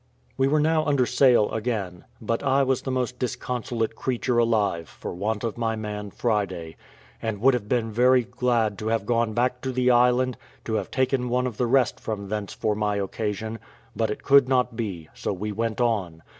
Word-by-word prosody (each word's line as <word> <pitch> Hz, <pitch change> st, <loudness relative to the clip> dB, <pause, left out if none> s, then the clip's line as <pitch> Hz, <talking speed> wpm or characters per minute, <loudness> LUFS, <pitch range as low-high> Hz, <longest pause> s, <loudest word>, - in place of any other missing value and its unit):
We 135 Hz, +1 st, +2 dB
were 150 Hz, +2 st, +3 dB
now 155 Hz, +1 st, +2 dB
under 140 Hz, -3 st, +2 dB
sail 125 Hz, -4 st, +4 dB
again, 105 Hz, -6 st, -3 dB
but 115 Hz, +1 st, -2 dB
I 140 Hz, 0 st, +3 dB
was 130 Hz, -1 st, +1 dB
the -, -, -5 dB
most 125 Hz, -1 st, -2 dB
disconsolate 120 Hz, -2 st, -2 dB
creature 125 Hz, -1 st, 0 dB
alive 105 Hz, -8 st, +1 dB
for -, -, -7 dB
want 105 Hz, +5 st, -2 dB
of 115 Hz, 0 st, -3 dB
my 115 Hz, -1 st, 0 dB
man 105 Hz, -1 st, -5 dB
Friday, 95 Hz, -8 st, -2 dB, 0.5 s
and 110 Hz, -3 st, -3 dB
would 130 Hz, +5 st, +5 dB
have 110 Hz, -4 st, -3 dB
been 115 Hz, -3 st, 0 dB
very 125 Hz, +3 st, +4 dB
glad 120 Hz, -4 st, 0 dB
to 110 Hz, -, -4 dB
have 110 Hz, -2 st, 0 dB
gone 115 Hz, -1 st, +1 dB
back 125 Hz, +2 st, 0 dB
to 130 Hz, -, -2 dB
the 125 Hz, 0 st, +2 dB
island, 125 Hz, +1 st, +3 dB, 0.3 s
to 110 Hz, -, -3 dB
have 110 Hz, -, -1 dB
taken 130 Hz, -1 st, 0 dB
one 125 Hz, +1 st, +1 dB
of 120 Hz, -4 st, -4 dB
the 125 Hz, -, +1 dB
rest 130 Hz, -1 st, +2 dB
from 100 Hz, -3 st, -5 dB
thence 105 Hz, -2 st, -3 dB
for 110 Hz, -, -1 dB
my 105 Hz, 0 st, 0 dB
occasion, 105 Hz, +2 st, -3 dB, 0.4 s
but 110 Hz, -1 st, 0 dB
it 105 Hz, -, -5 dB
could 140 Hz, -2 st, +5 dB
not 125 Hz, -2 st, +2 dB
be: 95 Hz, -9 st, -4 dB
so -, -, -3 dB
we 105 Hz, +3 st, -4 dB
went 115 Hz, +2 st, -2 dB
on. 95 Hz, -9 st, 0 dB
115 Hz, 200 wpm, -25 LUFS, 105-125 Hz, 0.5 s, would